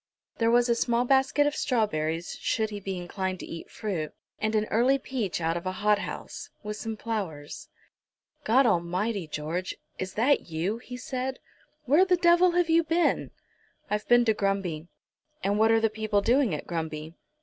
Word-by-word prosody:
There 230 Hz, 0 st, +3 dB
was 240 Hz, +1 st, +4 dB
a 235 Hz, -, +4 dB
small 235 Hz, +1 st, +1 dB
basket 270 Hz, +2 st, +3 dB
of 290 Hz, 0 st, 0 dB
strawberries, 170 Hz, -, -1 dB
should 220 Hz, -1 st, 0 dB
he 205 Hz, -, -5 dB
be 195 Hz, -1 st, -4 dB
inclined 185 Hz, +1 st, -3 dB
to -, -, -6 dB
eat 165 Hz, -, -8 dB
fruit, 175 Hz, -8 st, -3 dB, 0.3 s
and 215 Hz, 0 st, 0 dB
an 215 Hz, 0 st, +2 dB
early 250 Hz, +5 st, +4 dB
peach 250 Hz, -9 st, -3 dB
out 165 Hz, 0 st, 0 dB
of 175 Hz, +2 st, -4 dB
a 185 Hz, -, -1 dB
hothouse, 210 Hz, +1 st, -2 dB
with 210 Hz, 0 st, -4 dB
some 225 Hz, +1 st, -5 dB
flowers. 185 Hz, -11 st, -5 dB, 0.7 s
"God 255 Hz, +5 st, +4 dB
Almighty, 185 Hz, 0 st, 0 dB
George; 155 Hz, +5 st, -3 dB, 0.2 s
is 185 Hz, 0 st, -4 dB
that 245 Hz, -1 st, +2 dB
you?" 175 Hz, +8 st, -2 dB
he 250 Hz, 0 st, -8 dB
said. 255 Hz, +1 st, -3 dB, 0.5 s
"Where 295 Hz, +8 st, +5 dB
the 370 Hz, -1 st, +3 dB
devil 345 Hz, +1 st, +5 dB
have 350 Hz, -1 st, +2 dB
you 330 Hz, +1 st, +4 dB
been?" 330 Hz, +2 st, +1 dB, 0.6 s
"I've 210 Hz, 0 st, -1 dB
been 240 Hz, 0 st, +5 dB
to 220 Hz, -, +4 dB
Grumby." 195 Hz, -6 st, -1 dB, 0.6 s
"And 200 Hz, +2 st, +1 dB
what 220 Hz, +1 st, +5 dB
are 225 Hz, 0 st, +5 dB
the 225 Hz, -, +3 dB
people 215 Hz, -1 st, 0 dB
doing 240 Hz, -, +3 dB
at -, -, -6 dB
Grumby?" 160 Hz, -2 st, -4 dB
215 Hz, 175 wpm, -27 LUFS, 180-250 Hz, 0.7 s, Where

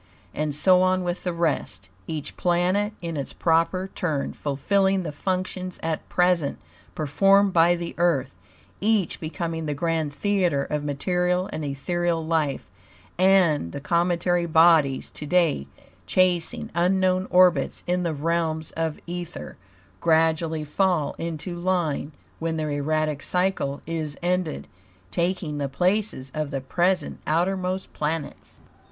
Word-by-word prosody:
And 150 Hz, -1 st, -1 dB
so 185 Hz, +4 st, +5 dB
on 185 Hz, 0 st, +2 dB
with 175 Hz, 0 st, -3 dB
the 180 Hz, -, -1 dB
rest, 160 Hz, -, -2 dB, 0.2 s
each 155 Hz, -3 st, -5 dB
planet 185 Hz, +4 st, +1 dB
in 165 Hz, -1 st, -3 dB
its 140 Hz, -, -4 dB
proper 170 Hz, +3 st, +1 dB
turn 155 Hz, -6 st, -2 dB
fulfilling 190 Hz, +7 st, +1 dB
the 155 Hz, -, -4 dB
functions 185 Hz, +3 st, -3 dB
at 160 Hz, -1 st, -3 dB
present 180 Hz, -5 st, +2 dB, 0.4 s
performed 195 Hz, +6 st, +3 dB
by 170 Hz, +1 st, +5 dB
the 170 Hz, -1 st, -5 dB
Earth, 165 Hz, -7 st, +1 dB, 0.5 s
each 210 Hz, -3 st, +1 dB
becoming 165 Hz, 0 st, -4 dB
the 150 Hz, -, -2 dB
grand 160 Hz, -1 st, -1 dB
theater 175 Hz, -3 st, +1 dB
of 150 Hz, 0 st, -3 dB
material 180 Hz, +5 st, 0 dB
and 155 Hz, -, -4 dB
ethereal 165 Hz, +4 st, -1 dB
life, 155 Hz, -4 st, -1 dB, 0.5 s
and 180 Hz, -, +3 dB
the -, -, -4 dB
cometary 175 Hz, +2 st, +1 dB
bodies, 160 Hz, -4 st, +4 dB
to 150 Hz, -, -6 dB
day 165 Hz, -, +2 dB, 0.4 s
chasing 180 Hz, -2 st, +1 dB
unknown 185 Hz, +1 st, +2 dB
orbits 180 Hz, -6 st, +3 dB
in 180 Hz, +1 st, 0 dB
the 170 Hz, -3 st, -1 dB
realms 160 Hz, 0 st, -1 dB
of 160 Hz, -2 st, -2 dB
ether, 175 Hz, 0 st, -6 dB, 0.4 s
gradually 160 Hz, -1 st, +2 dB
fall 155 Hz, -1 st, +1 dB
into 165 Hz, +1 st, -4 dB
line 175 Hz, -4 st, -1 dB, 0.3 s
when 165 Hz, 0 st, -2 dB
their 155 Hz, -1 st, -2 dB
erratic 150 Hz, 0 st, -1 dB
cycle 180 Hz, -6 st, -1 dB
is 155 Hz, -3 st, -4 dB
ended, 180 Hz, -2 st, -1 dB, 0.4 s
taking 170 Hz, -4 st, -1 dB
the 140 Hz, -1 st, -2 dB
places 180 Hz, -3 st, 0 dB
of 155 Hz, -2 st, -2 dB
the 140 Hz, -2 st, -3 dB
present 175 Hz, +7 st, 0 dB
outermost 185 Hz, +3 st, -1 dB
planets. 150 Hz, -1 st, -4 dB
170 Hz, 130 wpm, -24 LUFS, 150-180 Hz, 0.5 s, so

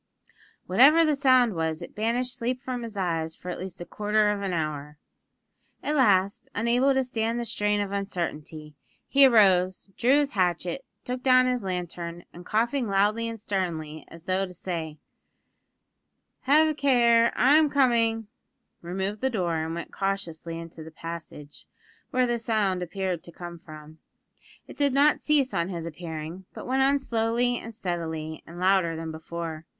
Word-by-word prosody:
Whatever 280 Hz, -, +6 dB
the 305 Hz, -2 st, +2 dB
sound 255 Hz, -5 st, +4 dB
was, 160 Hz, -2 st, -2 dB
it -, -, -10 dB
banished 245 Hz, +4 st, -1 dB
sleep 250 Hz, +1 st, -3 dB
from 255 Hz, -2 st, -4 dB
his 225 Hz, -3 st, -7 dB
eyes 165 Hz, -4 st, -1 dB
for 180 Hz, -, -9 dB
at -, -, -6 dB
least 185 Hz, -1 st, -7 dB
a -, -, -5 dB
quarter 210 Hz, +2 st, +1 dB
of 205 Hz, -1 st, -3 dB
an 195 Hz, -2 st, -2 dB
hour. 150 Hz, -3 st, -3 dB, 0.9 s
At 300 Hz, -, -1 dB
last, 200 Hz, -7 st, +2 dB
unable 245 Hz, +5 st, +2 dB
to 265 Hz, -, +2 dB
stand 230 Hz, -1 st, -2 dB
the 240 Hz, -, -3 dB
strain 210 Hz, -2 st, 0 dB
of 200 Hz, -1 st, -2 dB
uncertainty, 160 Hz, -6 st, -4 dB, 0.3 s
he 275 Hz, 0 st, +7 dB
arose, 190 Hz, -5 st, +3 dB
drew 260 Hz, +4 st, +4 dB
his 290 Hz, -1 st, +1 dB
hatchet, 180 Hz, +5 st, -1 dB, 0.2 s
took 250 Hz, 0 st, -4 dB
down 255 Hz, -1 st, +5 dB
his 250 Hz, -1 st, 0 dB
lantern, 175 Hz, -2 st, -5 dB
and, 175 Hz, -, -11 dB
coughing 235 Hz, +3 st, 0 dB
loudly 210 Hz, +4 st, +1 dB
and 225 Hz, -1 st, -7 dB
sternly 165 Hz, -6 st, -3 dB
as 165 Hz, -1 st, -13 dB
though 190 Hz, +2 st, 0 dB
to 180 Hz, -, -12 dB
say: 165 Hz, -4 st, -5 dB, 1.5 s
"Have 300 Hz, +4 st, +5 dB
a -, -, 0 dB
care, 240 Hz, -5 st, +4 dB
I'm 295 Hz, +4 st, +5 dB
coming!" 230 Hz, -5 st, +2 dB, 0.6 s
removed 190 Hz, +4 st, -3 dB
the 265 Hz, -, +1 dB
door 180 Hz, -8 st, -1 dB
and 160 Hz, +1 st, -3 dB
went 170 Hz, -, -7 dB
cautiously 175 Hz, -4 st, -3 dB
into 165 Hz, -1 st, -9 dB
the 160 Hz, -, -10 dB
passage, 160 Hz, -3 st, -9 dB, 0.4 s
where 255 Hz, -2 st, +2 dB
the 240 Hz, -1 st, -1 dB
sound 210 Hz, -5 st, 0 dB
appeared 180 Hz, -1 st, -3 dB
to 170 Hz, -, -12 dB
come 175 Hz, 0 st, -9 dB
from. 155 Hz, -2 st, -13 dB, 0.7 s
It -, -, -13 dB
did 285 Hz, -2 st, +2 dB
not 285 Hz, +2 st, +4 dB
cease 285 Hz, -3 st, +2 dB
on 170 Hz, +2 st, 0 dB
his 170 Hz, -3 st, -5 dB
appearing; 165 Hz, +2 st, -7 dB
but -, -, -8 dB
went 265 Hz, +1 st, +1 dB
on 275 Hz, +1 st, +4 dB
slowly 240 Hz, -1 st, 0 dB
and 225 Hz, 0 st, -9 dB
steadily, 160 Hz, -6 st, -4 dB
and 170 Hz, +1 st, -10 dB
louder 185 Hz, -3 st, +2 dB
than 160 Hz, 0 st, -5 dB
before. 160 Hz, 0 st, -6 dB
195 Hz, 165 wpm, -26 LUFS, 170-245 Hz, 1.5 s, he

